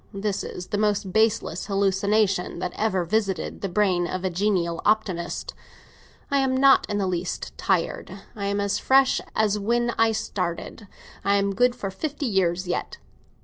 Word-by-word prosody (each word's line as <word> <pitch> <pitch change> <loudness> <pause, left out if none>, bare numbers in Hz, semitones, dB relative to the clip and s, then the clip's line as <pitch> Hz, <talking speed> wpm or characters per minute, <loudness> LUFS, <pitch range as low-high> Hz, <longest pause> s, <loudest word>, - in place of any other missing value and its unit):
This 200 0 -2
is 180 - -7
the 205 - -1
most 205 -3 0
baseless 220 -5 +1
hallucination 195 -1 +1
that 180 0 -3
ever 190 -5 0
visited 195 -2 -1
the 195 - -2
brain 180 -2 +1
of 185 +1 -4
a 185 - 0
genial 175 -3 0
optimist. 195 -5 0 0.8
I 280 - +3
am 260 -1 +1
not 270 0 +5
in 205 - -1
the 200 - 0
least 180 -1 -3
tired; 185 -3 -1 0.2
I 200 -2 -4
am 200 0 0
as 200 0 0
fresh 265 0 +4
as 210 -1 +2
when 235 +3 +1
I 225 0 +5
started; 200 -1 -4 0.4
I 200 - +3
am 200 0 +1
good 245 +3 +3
for 195 -5 -4
fifty 290 +8 -4
years 185 -5 +1
yet. 175 - -3
200 Hz, 165 wpm, -24 LUFS, 185-220 Hz, 0.8 s, not